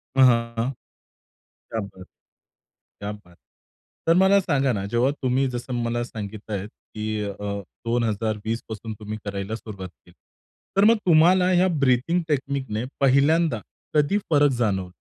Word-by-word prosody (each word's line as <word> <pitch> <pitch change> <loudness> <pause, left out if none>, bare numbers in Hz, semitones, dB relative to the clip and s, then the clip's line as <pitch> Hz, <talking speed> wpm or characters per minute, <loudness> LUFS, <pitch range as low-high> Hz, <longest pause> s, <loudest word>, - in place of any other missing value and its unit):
अ, - - 0
हां, 115 -1 +3 1.0
क्या 115 - -1
बात, 95 -2 -9 1.0
क्या 100 0 -4
बात. 90 -5 -15 0.7
तर 165 - +5
मला 190 +2 +6
सांगा 140 -7 +1
ना 100 -3 -2
जेव्हा 120 +3 +3
तुम्ही 130 +1 +2
जसं 125 +1 -5
मला 120 +1 -1
सांगितलं 110 -1 -7
आहे 95 - -4
की 110 0 -6
अ, 100 -1 -4 0.5
2020 110 -1 -1
पासून 110 0 -6
तुम्ही 105 0 -5
करायला 100 +1 -4
सुरुवात 100 -5 -8
केली. 90 0 -23 0.6
तर 200 - +5
मग 230 +1 +6
तुम्हाला 180 +3 +5
या 185 +1 +4
ब्रीदींग 140 +6 +2
टेकनीकने 135 -6 -1 0.2
पहिल्यांदा 140 0 +3 0.3
कधी 150 +7 +3
फरक 145 -2 +5
जाणवलं? 95 -6 0
120 Hz, 135 wpm, -24 LUFS, 105-145 Hz, 1.0 s, मला